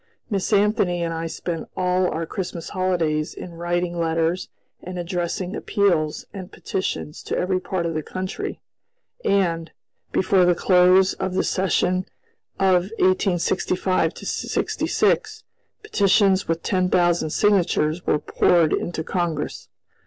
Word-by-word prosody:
Miss 195 0 -1
Anthony 200 -4 +2
and 165 0 -2
I 165 0 -3
spent 165 0 -5
all 180 0 +2
our 165 +1 -3
Christmas 175 -2 -5
holidays 170 -5 0
in 175 - -8
writing 175 +1 -2
letters 165 +2 0 0.3
and 180 0 -7
addressing 175 +1 -3
appeals 170 -7 0
and 190 -1 -8
petitions 185 -5 -4
to - - -3
every 185 0 0
part 185 -2 -3
of 165 - -1
the 155 - -1
country, 185 +4 -5 0.6
and, 170 -4 +1 0.4
before 185 0 +3
the 175 0 +4
close 185 +1 +5
of 190 -1 -3
the - - +2
session 185 -1 +1 0.5
of 185 -1 +3
1865 185 -2 +1
66, - - -1 0.4
petitions 200 - +3
with 165 0 -1
ten 185 -2 +1
thousand 175 -3 +2
signatures 175 -4 +2
were - - +3
poured 165 +1 +2
into 170 -2 -2
Congress. 170 -4 -3
180 Hz, 125 wpm, -23 LUFS, 165-185 Hz, 0.6 s, close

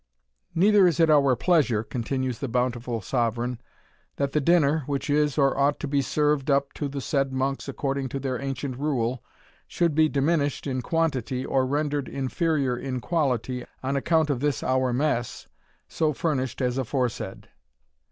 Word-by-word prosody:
"Neither 200 +2 +5
is 170 -1 0
it 165 -1 +5
our 140 -4 +5
pleasure," 130 - +2
continues 125 +2 -3
the 140 - -3
bountiful 120 -1 -1
sovereign, 120 +2 -1 0.5
"that 140 -1 -1
the 150 - +1
dinner, 160 -1 +3
which 140 0 -2
is 150 0 +2
or 135 -2 +3
ought 140 +1 +2
to 150 - -3
be 140 0 +1
served 150 0 0
up 140 0 +2
to 145 - -3
the 140 0 -5
said 135 0 0
monks 135 +1 -2
according 135 -1 -2
to 135 - -4
their 130 -1 -3
ancient 135 -1 -4
rule, 130 -4 -1 0.4
should 170 -3 0
be 155 +1 +4
diminished 145 0 0
in 130 -2 -2
quantity, 135 -5 -1
or 130 -1 +1
rendered 145 0 -1
inferior 140 -1 0
in 130 +1 -4
quality, 130 -5 -1 0.2
on 135 +2 -1
account 160 +2 +2
of 130 - -1
this 145 0 -1
our 130 0 +1
mess, 120 -2 -1 0.4
so 155 -1 0
furnished 130 -4 -2
as 125 +1 0
aforesaid." 125 -1 -3
135 Hz, 160 wpm, -25 LUFS, 130-150 Hz, 0.5 s, Neither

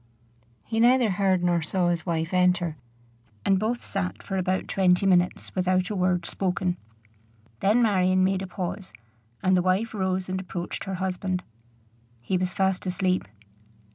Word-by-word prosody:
He 225 0 -2
neither 240 -1 +5
heard 190 -1 +1
nor 175 -1 +2
saw 175 +3 0
his 170 +1 -2
wife 165 0 -1
enter, 180 -3 +2 0.7
and 195 -1 +3
both 230 +4 -2
sat 190 -2 -3
for 195 - -4
about 185 0 -1
twenty 185 0 +2
minutes 180 -1 +2
without 185 +1 +1
a - - -2
word 180 -2 +1
spoken. 180 -1 -1 0.8
Then 220 +5 +3
Marion 185 -3 +3
made 190 0 +1
a 190 - -5
pause, 185 - -5 0.5
and 185 0 +4
the 180 - +3
wife 190 +6 0
rose 190 -2 -1
and 185 0 -2
approached 175 -2 -5
her 190 -1 -3
husband. 185 0 -2 0.8
He 120 +11 -2
was 185 0 0
fast 190 -1 0
asleep. 185 - 0
185 Hz, 155 wpm, -26 LUFS, 180-195 Hz, 0.8 s, neither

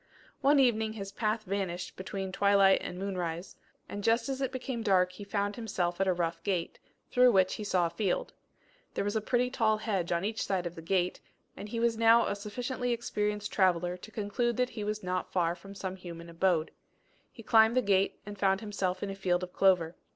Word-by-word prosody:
One 285 +1 +4
evening 220 -4 +2
his 195 -2 -6
path 215 +1 -1
vanished 190 -3 -3
between 190 0 -5
twilight 200 0 +4
and 180 - -6
moonrise, 180 -3 -4 0.3
and 205 0 -6
just 230 +5 +2
as 270 0 -3
it 265 - 0
became 260 -2 -4
dark 185 -4 +3
he 185 +3 -9
found 200 0 -2
himself 190 -6 -2
at 195 - +2
a - - +4
rough 170 -1 -2
gate, 185 -4 -2 0.3
through 250 0 +6
which 190 -2 +3
he 215 - -5
saw 185 -4 +2
a 165 - -2
field. 185 +1 -1 0.6
There - - 0
was 205 +2 -2
a 220 - +1
pretty 250 +3 +1
tall 220 -3 +2
hedge 195 -6 -2
on 170 +2 0
each 220 +1 -2
side 185 -3 -1
of 175 - -4
the 165 - -9
gate, 180 +1 0 0.4
and 210 - -8
he 230 - -3
was 230 -1 +1
now 230 +1 +6
a - - -1
sufficiently 245 +5 -3
experienced 210 -3 -2
traveller 180 -2 +2
to 180 +4 -11
conclude 220 +3 -1
that 250 0 +1
he 220 -2 -5
was 210 0 -3
not 180 0 -2
far 170 -2 +1
from 195 +3 -12
some 190 -1 -4
human 170 -2 -9
abode. 165 -2 +1 0.6
He 230 - -12
climbed 225 +2 +5
the 255 - +4
gate 195 -1 +2
and 205 -1 -8
found 195 -1 +3
himself 195 -3 -2
in 200 - -2
a - - -6
field 180 -2 0
of 180 - -7
clover. 180 -4 +3
200 Hz, 210 wpm, -30 LUFS, 180-220 Hz, 0.6 s, through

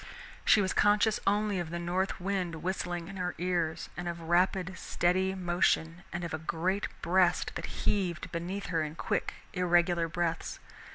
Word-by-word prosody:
She 210 - +6
was 185 - 0
conscious 210 +1 +4
only 205 -1 +2
of 170 -2 -3
the 170 - -3
north 180 +3 -1
wind 180 -3 -2
whistling 175 -2 -2
in 195 0 -8
her 180 -1 -2
ears, 175 -3 -1
and 175 0 -4
of 170 0 -3
rapid 180 +3 +1
steady 185 +2 +1
motion 175 -2 +1
and 175 +1 -3
of 170 - -4
a 155 - -2
great 180 +5 -1 0.2
breast 180 0 +3
that - - -4 0.2
heaved 180 -5 0
beneath 180 +4 -3
her 165 - +2
in 155 0 -3
quick, - - -1 0.2
irregular 175 -2 +3
breaths. 165 -1 -2
175 Hz, 165 wpm, -31 LUFS, 170-190 Hz, 0.2 s, She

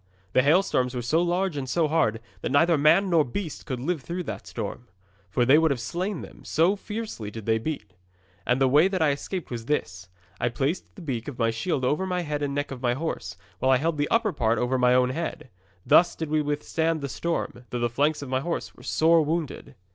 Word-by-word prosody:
The 130 - +5
hailstones 140 -4 +2
were 120 - -3
so 155 +8 +2
large 175 0 0
and 135 -3 -4
so 165 +1 +2
hard 145 -8 +1 0.2
that - - -2
neither 165 +4 +4
man 155 +6 +4
nor 165 -3 +5
beast 155 +5 -5
could 130 -2 -3
live 160 +4 -2
through 175 +5 -4
that - - -6
storm, - - -6 0.4
for 120 +5 +1
they 140 +5 +6
would 160 0 +3
have 140 -4 0
slain 175 - -3
them, - - -12
so 170 +6 +2
fiercely 210 - -6
did 110 0 -8
they 110 0 +2
beat. 110 -7 -5 0.5
And 125 +1 +1
the 135 - +4
way 150 +7 +5
that 190 -4 0
I 150 - +4
escaped 170 +5 -5
was 115 -2 -5
this. 90 -11 -2 0.3
I 120 - +1
placed 135 +8 -2
the 185 - -10
beak 120 -7 -3
of 140 -4 -6
my 115 -1 +2
shield 130 +3 -1
over 150 +9 0
the 180 -1 -1
head 150 -2 -3
and 140 -1 -2
neck 145 0 -2
of 130 -2 -7
my 120 -1 +1
horse, 125 - -4 0.2
while 130 - +1
I 130 - +6
held 155 +2 -1
the 145 - 0
upper 225 -4 +2
part 115 -2 +1
over 125 +1 0
my 125 0 +4
own 125 0 +3
head. 155 -2 -5 0.3
Thus 175 0 +5
did 160 -2 -5
we 155 0 +3
withstand 155 +2 -1
the 140 - -2
storm, 135 -4 -3
though 125 - -3
the 120 0 +1
flanks 145 +5 0
of 135 - -7
my 130 0 +1
horse 170 +5 -3
were - - -16
sore 165 0 +3
wounded. 160 0 -3
145 Hz, 230 wpm, -26 LUFS, 125-165 Hz, 0.5 s, they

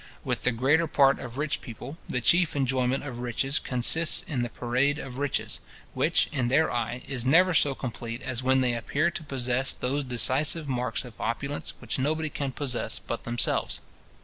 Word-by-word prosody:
With - - -2
the 125 - +2
greater 140 +8 +2
part 140 -2 +3
of 120 0 -8
rich 150 0 -1
people, 125 +6 -9
the 125 - -1
chief 170 +5 +3
enjoyment 130 -1 0
of 125 -4 -7
riches 125 +3 -1
consists 135 +6 +4
in 130 -5 -3
the 120 - -2
parade 125 +5 0
of 135 -3 -7
riches; 145 -1 -1 0.3
which, - - +2
in 125 -2 -1
their 140 +6 +2
eye, 120 +1 -3
is 130 -4 -2
never 175 +8 +4
so 145 -3 +4
complete 120 -1 -6
as 130 -2 -3
when 130 +1 +3
they 125 -2 +1
appear 140 +8 0
to 170 - -6
possess 130 -2 +1
those 140 +3 -2
decisive 135 +5 +2
marks 125 0 -2
of 120 -3 -11
opulence 140 +5 -3
which - - -4
nobody 155 +3 -1
can 140 -2 -3
possess 130 -3 -1
but 115 - -6
themselves. 120 0 +1
130 Hz, 180 wpm, -27 LUFS, 125-145 Hz, 0.3 s, consists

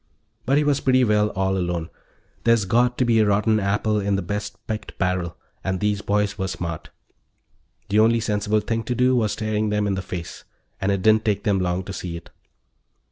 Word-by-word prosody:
But 135 +2 +3
he 150 - +3
was 145 -1 +2
pretty 130 -1 +3
well 105 -2 +3
all 95 0 +1
alone; 85 -3 -2 0.5
there's 115 -3 +3
got 120 +5 +2
to 125 - +2
be 115 -1 +3
a 110 - +4
rotten 105 +2 +2
apple 105 +2 0
in 100 0 0
the 95 - -1
best 105 +1 -4
picked 110 -1 -5
barrel 90 -2 -1 0.3
and 95 -1 -1
these 105 -1 0
boys 105 0 0
were 95 - -1
smart. 85 -4 -5 1.0
The 105 +2 +3
only 115 +1 +4
sensible 105 -1 0
thing 115 +2 -2
to 125 - -2
do 125 +2 +3
was 110 -4 +1
staring 110 -1 -1
them 105 0 0
in 100 - 0
the 95 - -2
face, 90 -2 -7 0.4
and 100 +1 +1
it 100 -2 -1
didn't 110 0 +4
take 105 -2 0
them 100 -2 +2
long 90 0 -1
to 95 - -7
see 90 -2 -5
it. 85 - -13
105 Hz, 205 wpm, -23 LUFS, 95-110 Hz, 1.0 s, a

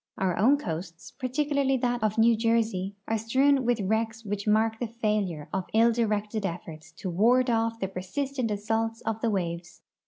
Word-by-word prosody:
Our 185 -2 0
own 255 +10 +4
coasts, 170 - -6
particularly 275 +1 0
that 245 -1 -1
of 215 0 0
New 230 +1 +5
Jersey, 220 -4 0
are 225 0 0
strewn 265 +4 +2
with 240 -2 +1
wrecks 220 +3 -1
which 205 0 -4
mark 220 +1 +2
the 240 - -2
failure 210 -9 -2
of 190 -1 -1
ill 230 +1 +5
directed 215 -2 -1
efforts 165 -4 -6
to 185 +3 -5
ward 245 +7 +3
off 230 0 0
the 190 - -1
persistent 230 +7 -3
assaults 225 +2 -1
of 225 0 -3
the 230 - +1
waves. 175 -3 -4
220 Hz, 175 wpm, -27 LUFS, 195-235 Hz, -, New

